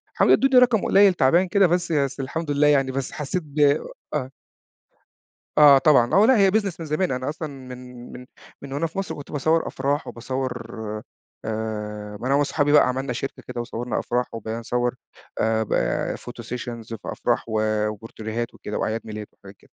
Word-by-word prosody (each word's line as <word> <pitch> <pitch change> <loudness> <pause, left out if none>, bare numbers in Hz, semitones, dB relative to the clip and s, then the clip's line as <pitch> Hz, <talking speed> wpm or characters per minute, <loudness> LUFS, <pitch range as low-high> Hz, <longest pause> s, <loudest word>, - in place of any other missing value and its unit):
حاولوا - - +5
يدوني 270 0 +2
رقم 240 -4 +4
قليل 195 -1 +6
تعبان 170 +5 +3
كده 190 +1 +4
بس 175 0 0
بس 140 -3 0
الحمد 145 +3 -3
لله 145 +1 +3
يعني، 135 -2 +3
بس 135 0 -3
حسّيت 155 +4 -3
ب 145 +1 -7 0.5
آه. 130 -4 -2 1.3
آه 145 -2 +9
طبعًا، 135 -5 +4
آه، 200 +3 +6
لأ، 255 0 +5
هي 195 -2 +5
Business 200 -5 0
من 165 - -5
زمان، 155 +3 0
أنا 130 +2 -2
أصلًا 155 +1 -4
من 125 -3 -10
من 125 - -10 0.4
من 140 -1 -8
وأنا 165 +4 0
في 160 - -12
مصر 195 - -4
كنت 145 - -10
باصَوَّر 155 +3 +1
أفراح 140 +2 -2
وباصَوَّر 125 -1 -5 0.7
آآ، 105 -1 -4
ما 125 - -3
أنا 140 - +3
وصحابي 145 0 +1
بقى 150 - +6
عملنا 130 0 -2
شركة 135 +3 -5
كده 125 -1 -4
وصوَّرنا 120 0 -3
أفراح 125 +1 -2
وبقينا 115 0 -4
نصوَّر، 120 +1 -1 0.4
آآ 110 0 +2
با - - -1
Photo 120 -1 -9
Sessions 120 -2 -6
في 115 - -6
أفراح - - 0
وبورتريهات 110 +1 -2
وكده، 105 - -6
وأعياد 110 +1 -1
ميلاد 105 -1 -7
وحاجات 100 0 -15
كده. - - -25
130 Hz, 180 wpm, -23 LUFS, 115-150 Hz, 1.3 s, آه